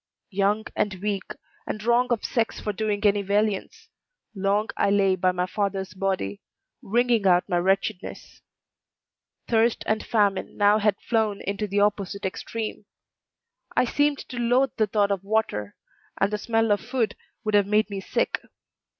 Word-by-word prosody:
Young 205 +2 +1
and 205 -2 0
weak, 195 0 -3 0.3
and 210 - -4
wrong 240 +2 +3
of 240 -3 0
sex 230 -2 -1
for 210 - -3
doing 210 0 -1
any 205 0 +4
valiance, 200 0 -1 0.5
long 200 +2 0
I - - +2
lay 195 -1 +3
by 185 0 +2
my 180 0 -1
father's 190 0 -2
body, 185 - -2 0.4
wringing 235 -1 +2
out 180 -1 +4
my 175 -3 +1
wretchedness. 190 0 -2 1.1
Thirst 230 0 +2
and 215 0 0
famine 205 -4 0
now 205 +1 +5
had 210 -1 +2
flown 220 -3 +1
into 200 +2 -2
the 200 +1 +1
opposite 200 -1 0
extreme; 215 +2 -4 0.9
I - - +4
seemed 290 +3 +1
to 250 - -7
loathe 245 +2 +3
the 215 - +2
thought 205 0 +1
of 195 -1 -1
water, 195 - -1 0.4
and 200 +2 +1
the 210 - -1
smell 225 0 +1
of 205 - +2
food 230 -6 -1 0.3
would 215 -1 -2
have 205 -1 +4
made 210 +1 +2
me 200 - -3
sick. - - -1
205 Hz, 160 wpm, -25 LUFS, 195-220 Hz, 1.1 s, now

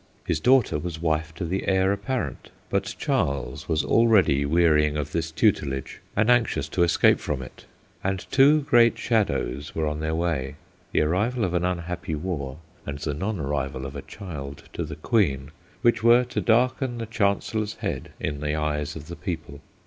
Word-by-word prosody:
His 85 -5 0
daughter 125 - +3
was 85 0 -5
wife 80 -1 0
to 90 - -4
the 95 +4 -2
heir 95 0 +3
apparent. 110 +6 -4 0.2
But - - -1
Charles 70 +1 -1
was 80 -2 +1
already 95 -12 +4
wearying 75 -2 +3
of 75 0 -3
this 80 0 -1
tutelage, 75 - 0
and 105 +1 +2
anxious 120 - +2
to 85 - -1
escape 85 -1 +4
from 70 -3 -3
it; - - -13 0.4
and 95 -1 -2
two 145 +3 +6
great 120 -4 +4
shadows 70 - -1
were 80 - 0
on 75 0 -2
their 80 +1 -1
way, 75 -5 -1 0.4
the - - +2
arrival 105 +9 +1
of 90 - -3
an 90 -1 +1
unhappy 90 -2 -2
war 75 -5 -4 0.3
and 70 -1 -5
the 75 +1 -3
non 95 +6 -3
arrival 70 -2 -2
of 70 +1 -7
a 70 - -5
child 70 -8 -8
to 85 - -3
the 75 -1 -6
Queen, 75 - 0 0.3
which 120 - +3
were 120 +2 +6
to 125 - -3
darken 125 +2 +2
the 115 - -4
Chancellor's 105 0 -1
head - - -4
in 75 -1 -3
the 75 +1 -1
eyes 75 -1 -2
of 75 -1 -9
the 85 - -7
people. 80 -7 -5
85 Hz, 180 wpm, -25 LUFS, 75-105 Hz, 0.4 s, two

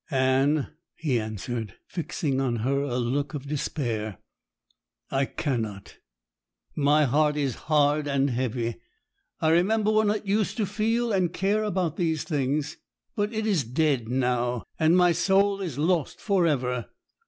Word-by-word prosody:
'Anne,' 135 +1 +2 0.3
he 140 -7 0
answered, 110 0 -5
fixing 145 -5 -2
on 125 -3 0
her 140 +1 +1
a 135 -3 -2
look 135 +5 -1
of 140 -1 -6
despair, 115 - -3 0.9
'I 135 0 +2
cannot. 110 -10 -4 0.8
My 150 +1 +4
heart 150 +3 +2
is 140 -4 0 0.2
hard 150 0 +3
and 140 -1 +1
heavy; 120 -1 -2 0.6
I 160 - +3
remember 205 +6 +3
when 215 -1 +3
it 210 0 -1
used 205 +3 0
to 215 - +1
feel 225 +3 0
and 185 -3 +1
care 205 +4 0
about 180 -6 -1
these 160 -3 0
things; 145 -1 -1 0.4
but 205 +1 0
it 220 -1 -2
is 195 -9 +2
dead 130 -1 0
now, 125 -1 0 0.2
and 160 +2 +4
my 180 -1 +5
soul 195 +4 +2
is 165 -9 -4
lost 160 0 0
for 195 -5 +2
ever. 125 -5 -1
150 Hz, 145 wpm, -26 LUFS, 130-180 Hz, 0.9 s, my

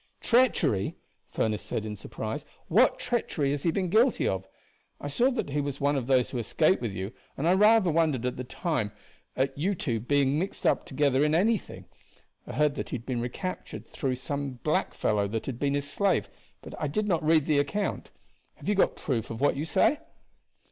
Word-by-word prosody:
"Treachery!" 170 - +2 0.3
Furniss 110 -2 -1
said 110 - -4
in 105 -1 -4
surprise; 110 +7 -5 0.3
"what 225 +10 +4
treachery 195 - -1
has 145 -1 -2
he 170 - +1
been 185 +2 0
guilty 230 +5 +3
of? 95 0 -2 0.5
I - - -5
saw 235 - +2
that 245 - -3
he 145 +1 0
was 140 -1 -4
one 145 +1 +2
of 130 -3 -2
those 130 -2 +3
who 125 - -2
escaped 155 - +2
with 115 -4 -2
you, 95 +4 -5 0.2
and 155 - 0
I 175 - +5
rather 210 -1 +5
wondered 155 -6 +1
at 125 - -1
the 125 - -5
time 130 - -2 0.4
at 135 +1 0
you 185 +8 0
two 120 -9 -1
being 140 +4 +2
mixed 190 +3 -4
up - - +2
together 140 -1 +2
in 150 +1 +2
anything. 210 +5 0 0.6
I - - -6
heard 150 +3 +2
that - - -4
he - - -3
had 115 -1 -7
been 125 -3 -2
recaptured 155 +10 -5
through 130 -4 -2
some 140 +1 -4
black - - 0
fellow 105 -1 +1
that 110 +2 -3
had 125 -3 -5
been 140 0 +1
his 145 0 -2
slave, 170 - +1 0.3
but - - -9
I 150 - 0
did 210 +9 -1
not 170 -5 +1
read 155 -1 +4
the 150 -2 +3
account. 200 +9 -2 0.5
Have - - -12
you 210 - +3
got 195 - +2
proof 120 -6 -2
of 115 - -5
what 145 - +3
you 145 +3 -2
say?" 280 - +3
145 Hz, 205 wpm, -28 LUFS, 125-175 Hz, 0.6 s, I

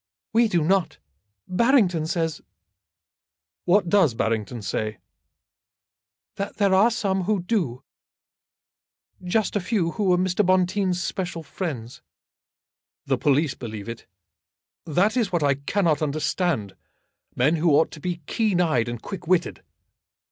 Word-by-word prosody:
"We 230 +1 +4
do 175 -6 +1
not. 180 -1 +1 0.5
Barrington 185 - +2
says 165 -3 -2 0.6
" 75 +1 -69
"What 180 +1 +3
does 170 - +3
Barrington 115 0 -2
say?" 110 +2 -3 1.4
"That 200 - -4
there 200 -2 +3
are 200 +5 +5
some 195 -5 -1
who 210 0 +1
do; 165 - -1 1.4
just 200 +5 0
a - - +2
few, 180 -3 0
who 210 +2 -2
were 180 -1 +4
Mr. 185 +2 +1
Bonteen's 185 0 +1
special 175 -3 -4
friends." 130 -11 -6 1.0
"The - - 0
police 145 0 +2
believe 110 -4 -7
it. 115 0 -8 0.8
That 190 - +2
is 230 -6 0
what 170 -4 0
I 140 -1 +4
cannot 155 +3 0
understand; 150 - -1 0.6
men 145 +7 +2
who 165 +2 +2
ought 150 +2 +3
to 155 - -10
be 175 -1 -4
keen 210 -1 0
eyed 155 -9 +1
and 120 -1 -5
quick 190 - -8
witted. 175 -1 +1
175 Hz, 135 wpm, -24 LUFS, 140-195 Hz, 1.4 s, are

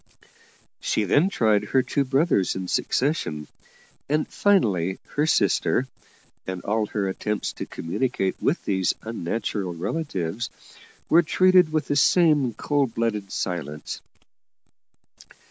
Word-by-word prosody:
She 110 - 0
then 145 - +3
tried 110 - +2
her 130 -1 +1
two 140 - 0
brothers 135 - +2
in 95 -1 -4
succession, 105 - -1 0.6
and 150 +1 +1
finally 95 - +2
her 150 +2 0
sister, 130 -4 +2 0.6
and 95 -1 -5
all 110 +1 0
her 100 -2 -2
attempts 105 +2 -2
to - - -6
communicate 95 +2 -2
with - - 0
these 95 -3 +1
unnatural 105 -3 -3
relatives 100 - -3 0.6
were 170 - +6
treated 180 0 +4
with 155 -2 0
the 145 - -1
same 145 - +4
cold 140 -1 0
blooded 105 -4 -1
silence. 75 -5 -4
115 Hz, 115 wpm, -24 LUFS, 95-150 Hz, 0.6 s, were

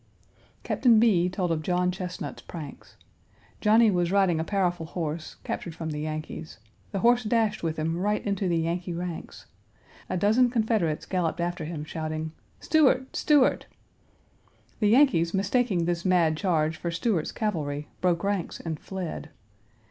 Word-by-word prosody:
Captain 235 -4 +4
B. 190 -6 +4
told 180 -1 -1
of 160 -1 0
John 180 +2 +1
Chesnut's 180 -1 -6
pranks. 155 -5 -10 0.6
Johnny 220 +1 +5
was 175 -2 +1
riding 190 -5 +3
a - - 0
powerful 175 -3 -1
horse, 160 -2 -4
captured 170 -3 -4
from 160 -1 -4
the 150 - -4
Yankees. 155 -4 -5 0.3
The 195 -3 -2
horse 240 +1 +4
dashed 220 -1 +1
with 165 -1 -2
him 160 +1 -1
right 205 +4 -1
into 200 -2 0
the 170 - +2
Yankee 170 +2 -2
ranks. 175 -1 -6 0.6
A - - -1
dozen 220 +7 +4
Confederates 220 -9 0
galloped 175 -4 -1
after 170 -1 -2
him, 155 -2 -5
shouting, 155 0 -4 0.3
"Stuart! 270 -4 +2
Stuart!" 295 -4 +3 1.1
The 210 - +3
Yankees, 215 - +4
mistaking 195 -2 +1
this 170 0 -1
mad 175 -4 +3
charge 160 -3 0
for 170 - -3
Stuart's 170 0 -1
cavalry, 150 -9 -2
broke 175 -1 +1
ranks 200 -3 -2
and 160 -3 -5
fled. 180 -5 -6
175 Hz, 150 wpm, -27 LUFS, 165-205 Hz, 1.1 s, Johnny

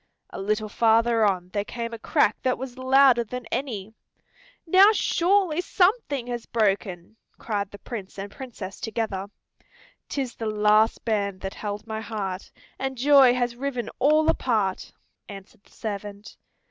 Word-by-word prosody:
A - - -6
little 215 +2 -1
farther 230 +1 +3
on 185 -3 +1
there 205 +1 -2
came 230 +2 -5
a 230 - -6
crack 215 - +2
that 255 -1 0
was 255 -1 -7
louder 260 -1 +4
than 250 +2 -7
any. 220 -6 -4 0.7
"Now 375 +4 +7
surely 360 -4 +2
something 360 - +1
has 240 -1 -5
broken," 200 -3 -1 0.2
cried 205 -3 -3
the 205 - -11
Prince 200 -4 -8
and 200 +1 -6
Princess 220 -7 -8
together. 215 -4 -3 0.8
"'Tis 265 -4 -3
the 225 - -5
last 215 +1 +3
band 200 -4 -1
that 195 0 -5
held 205 -1 -5
my 220 -1 -5
heart, 195 -4 -5 0.3
And 265 0 -3
joy 270 -1 +6
has 245 -1 -1
riven 250 -3 -4
all 305 +3 +4
apart," 210 -6 0 0.4
answered 195 0 -12
the - - -24
servant. 205 -1 -7
225 Hz, 145 wpm, -25 LUFS, 205-260 Hz, 0.8 s, Now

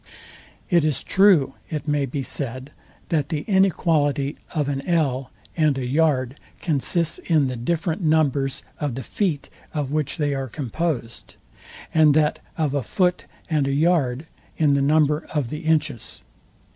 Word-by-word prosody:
It 170 -3 +4
is 150 -3 0
true, 185 -9 +4 0.2
it 155 -1 -4
may 145 -2 +1
be 135 +2 -3
said, 130 +1 -5 0.4
that 150 -4 0
the 155 -4 -2
inequality 155 - +2 0.2
of 150 -3 0
an 140 -1 -2
ell 140 -7 +1 0.3
and 155 -4 +2
a 130 - -2
yard 135 -1 +1 0.2
consists 165 +2 -1
in 155 -4 +2
the 130 -1 -2
different 165 - -1
numbers 145 -4 +1 0.2
of 145 -5 -2
the 130 - -5
feet, 175 -9 -2 0.2
of 145 -3 -2
which 155 0 -1
they 145 -3 0
are 135 -1 -3
composed; 130 -1 -4 0.6
and 155 -2 +5
that 150 -1 +2 0.2
of 155 -4 0
a 140 - +1
foot 180 - 0 0.2
and 150 -4 +1
a 140 - 0
yard 145 -3 +1 0.3
in 150 -3 +3
the 140 - +2
number 150 +1 +2
of 140 -6 0
the 150 +4 -6
inches. 155 -6 -1
150 Hz, 155 wpm, -23 LUFS, 135-160 Hz, 0.6 s, and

